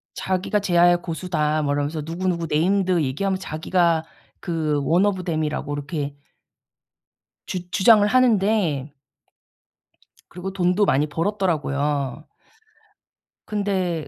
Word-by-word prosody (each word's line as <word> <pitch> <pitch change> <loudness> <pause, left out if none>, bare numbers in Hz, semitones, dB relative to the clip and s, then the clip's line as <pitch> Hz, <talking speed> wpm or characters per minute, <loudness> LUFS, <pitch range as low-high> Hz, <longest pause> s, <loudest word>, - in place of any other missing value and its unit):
자기가 190 +2 -1
"재야의 175 -2 +3
고수다." 160 -3 -1
뭐 145 -1 0
이러면서 145 +2 -2
누구누구 170 +2 -2
네임드 185 +2 +2
얘기하면서 185 +8 -1
자기가 165 +1 0 0.4
그 155 -4 -1
one 170 +8 +3
of 190 -3 -2
them이라고 155 -3 -2
이렇게 145 0 -4 1.3
주 180 -1 -5
주장을 205 +1 +5
하는데 205 - +2 1.4
그리고 180 +2 -6
돈도 185 +2 +2
많이 145 -3 +2
벌었더라고요. 150 - -1 1.2
근데 190 -6 -2
170 Hz, 285 characters per minute, -22 LUFS, 150-190 Hz, 1.4 s, 주장을